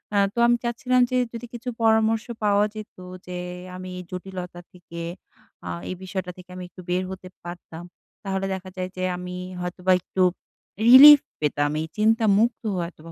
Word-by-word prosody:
আ -, -, +3 dB, 0.2 s
তো -, -, -21 dB
আমি 240 Hz, -, +4 dB
চাচ্ছিলাম 250 Hz, +2 st, +1 dB
যে, 255 Hz, -, +2 dB, 0.2 s
যদি 230 Hz, +1 st, -6 dB
কিছু 240 Hz, +1 st, -5 dB
পরামর্শ 220 Hz, 0 st, +3 dB, 0.2 s
পাওয়া 205 Hz, 0 st, +3 dB
যেত, 215 Hz, -1 st, -9 dB, 0.3 s
যে 180 Hz, 0 st, -5 dB, 0.4 s
আমি 185 Hz, 0 st, -7 dB
এই -, -, -7 dB
জটিলতা 180 Hz, -1 st, -7 dB
থেকে 170 Hz, -1 st, -10 dB, 0.7 s
আ -, -, -4 dB, 0.2 s
এই 185 Hz, -, -3 dB
বিষয়টা 185 Hz, -1 st, -4 dB
থেকে 180 Hz, 0 st, -14 dB
আমি 185 Hz, -, -7 dB
একটু 185 Hz, +1 st, -12 dB
বের 180 Hz, +1 st, +1 dB
হতে 190 Hz, -1 st, -8 dB, 0.2 s
পারতাম। 175 Hz, -1 st, -9 dB, 0.4 s
তাহলে 195 Hz, -1 st, -2 dB
দেখা 185 Hz, 0 st, -6 dB
যায় 185 Hz, 0 st, -3 dB
যে 185 Hz, -, -3 dB
আমি 180 Hz, 0 st, -6 dB, 0.3 s
হয়তোবা 180 Hz, +1 st, -1 dB
একটু 185 Hz, +2 st, -3 dB, 0.7 s
রিলিফ 285 Hz, +4 st, +11 dB, 0.2 s
পেতাম 145 Hz, -1 st, 0 dB
এই 160 Hz, -, -4 dB
চিন্তামুক্ত 220 Hz, +1 st, +3 dB
হয়তোবা 170 Hz, -2 st, -6 dB
185 Hz, 165 wpm, -24 LUFS, 180-220 Hz, 0.7 s, রিলিফ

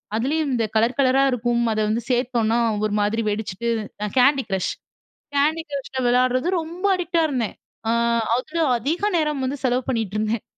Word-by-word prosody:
அதுலயும் 285 Hz, +5 st, 0 dB
இந்த 230 Hz, -2 st, +1 dB
கலர் 230 Hz, +4 st, +2 dB
கலரா 270 Hz, 0 st, +4 dB
இருக்கும். 240 Hz, 0 st, 0 dB
அத 215 Hz, -, -2 dB
வந்து 230 Hz, +2 st, 0 dB
சேத்தோம்னா 240 Hz, -2 st, +1 dB, 0.3 s
ஒரு 210 Hz, -, -1 dB
மாதிரி 220 Hz, +2 st, 0 dB
வெடிச்சுட்டு 210 Hz, +1 st, -3 dB, 0.4 s
அ -, -, -1 dB
Candy 270 Hz, +1 st, +5 dB
Crush. 190 Hz, -2 st, -1 dB, 0.7 s
Candy 310 Hz, +3 st, +2 dB
Crushல 270 Hz, -1 st, -4 dB
விளயாடுறது 255 Hz, +4 st, +2 dB
ரொம்ப 340 Hz, +4 st, -6 dB
அடிக்ட்டா 340 Hz, -2 st, 0 dB
இருந்தேன். 245 Hz, -7 st, -2 dB, 0.3 s
அ -, -, +3 dB, 0.4 s
அதில 310 Hz, +7 st, -3 dB, 0.2 s
அதிக 305 Hz, -, -2 dB, 0.2 s
நேரம் 300 Hz, -4 st, 0 dB
வந்து 275 Hz, +3 st, -2 dB
செலவு 255 Hz, 0 st, +1 dB
பண்ணிட்டுருந்தேன். 215 Hz, -1 st, -1 dB
250 Hz, 155 wpm, -22 LUFS, 225-280 Hz, 0.7 s, Candy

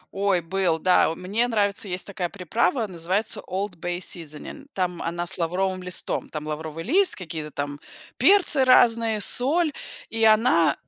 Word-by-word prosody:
Ой, 195 Hz, -2 st, +1 dB
был, 175 Hz, -1 st, 0 dB
да. 180 Hz, +2 st, +3 dB
О, 165 Hz, -, -4 dB
мне 205 Hz, +8 st, -1 dB
нравится, 205 Hz, -3 st, 0 dB
есть 180 Hz, -1 st, -3 dB
такая 185 Hz, -3 st, -4 dB
приправа, 220 Hz, -, 0 dB
называется 185 Hz, +3 st, -2 dB
Old 195 Hz, 0 st, -3 dB
Bay 175 Hz, +1 st, -3 dB
Seasoning, 170 Hz, -, -6 dB
там 180 Hz, -2 st, -2 dB
она 170 Hz, +1 st, -3 dB
с 175 Hz, -, -5 dB
лавровым 185 Hz, +2 st, -1 dB
листом. 180 Hz, -1 st, -4 dB
Там 150 Hz, -1 st, -6 dB
лавровый 155 Hz, +1 st, -5 dB
лист, 370 Hz, -, +3 dB
какие-то 160 Hz, -4 st, -6 dB
там 145 Hz, 0 st, -5 dB, 0.4 s
перцы 370 Hz, -8 st, +5 dB
разные, 230 Hz, -4 st, +4 dB
соль. 300 Hz, +9 st, +1 dB, 0.4 s
И 225 Hz, 0 st, -1 dB
она 215 Hz, -6 st, +4 dB
185 Hz, 155 wpm, -24 LUFS, 170-225 Hz, 0.4 s, перцы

